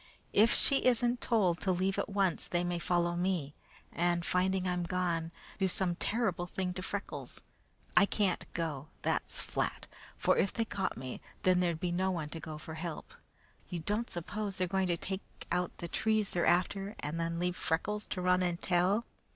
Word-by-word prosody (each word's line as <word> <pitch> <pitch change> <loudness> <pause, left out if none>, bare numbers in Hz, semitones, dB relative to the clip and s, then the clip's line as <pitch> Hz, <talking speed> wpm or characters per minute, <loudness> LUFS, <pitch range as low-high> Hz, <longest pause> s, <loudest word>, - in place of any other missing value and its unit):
If 220 +3 +6
she 275 -1 +3
isn't 245 0 +3
told 190 -8 +2
to 190 - +1
leave 190 +2 +1
at - - -1
once, 195 -3 +1
they 175 0 +1
may 175 -1 -1
follow 175 0 +1
me, 175 -5 0 0.4
and, 175 0 +1
finding 185 +1 +2
I'm 180 -1 0
gone, 170 -2 -1 0.3
do 190 - +3
some 180 -1 +1
terrible 195 -4 0
thing 180 0 -2
to 185 - -4
Freckles. 200 +2 -5 0.5
I 215 -2 +7
can't 200 -4 0
go 155 -4 -2 0.2
that's - - 0
flat - - -1 0.3
for - - +3
if 195 - +3
they 230 - 0
caught 195 -3 -2
me, 130 0 -6 0.2
then 185 -1 +5
there'd 170 -3 +1
be 175 0 -1
no 185 +2 +1
one 165 -5 -2
to 165 - -5
go 155 -1 -6
for 155 +1 -8
help. 160 0 -5 0.6
You 175 - -3
don't 210 +8 -1
suppose 195 +3 -3
they 185 - +2
are 180 - -4
going 190 -1 +3
to 175 -1 +1
take 190 +3 -3 0.3
out 180 0 0
the 170 - -4
trees 215 +3 +1
they're 175 - +1
after 195 +3 +2
and 150 +3 -2
then 165 0 -1
leave 180 +1 0
Freckles 210 +7 -1
to 185 - -3
run 180 0 +4
and 175 -1 0
tell? 190 +6 +2
180 Hz, 190 wpm, -32 LUFS, 170-195 Hz, 0.6 s, I